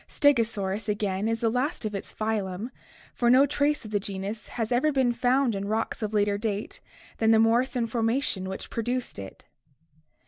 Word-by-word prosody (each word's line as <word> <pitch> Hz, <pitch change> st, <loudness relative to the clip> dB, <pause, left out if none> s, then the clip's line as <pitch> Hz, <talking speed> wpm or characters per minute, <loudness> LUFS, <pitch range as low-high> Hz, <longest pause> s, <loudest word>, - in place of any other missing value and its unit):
Stegosaurus 220 Hz, -6 st, +1 dB
again 205 Hz, -1 st, -1 dB
is 225 Hz, 0 st, -1 dB
the 230 Hz, -, +3 dB
last 250 Hz, +1 st, -1 dB
of 215 Hz, -, -2 dB
its 195 Hz, -, -5 dB
phylum, 215 Hz, 0 st, -2 dB, 0.4 s
for 240 Hz, -, +2 dB
no 260 Hz, +3 st, +7 dB
trace 290 Hz, -1 st, 0 dB
of 215 Hz, -, -8 dB
the 205 Hz, -, +1 dB
genus 200 Hz, +2 st, -5 dB
has 225 Hz, -1 st, -3 dB
ever 255 Hz, +6 st, +3 dB
been 260 Hz, -3 st, +2 dB
found 250 Hz, +1 st, +2 dB
in 200 Hz, 0 st, -3 dB
rocks 220 Hz, +2 st, -2 dB
of 215 Hz, -1 st, -2 dB
later 205 Hz, -1 st, +1 dB
date 210 Hz, -1 st, -3 dB, 0.4 s
than 220 Hz, -, +3 dB
the 225 Hz, -, +6 dB
Morrison 235 Hz, +2 st, +3 dB
formation 225 Hz, -4 st, -1 dB
which 190 Hz, -, -6 dB
produced 240 Hz, -, -2 dB
it. 95 Hz, -1 st, -10 dB
225 Hz, 175 wpm, -27 LUFS, 205-245 Hz, 0.4 s, no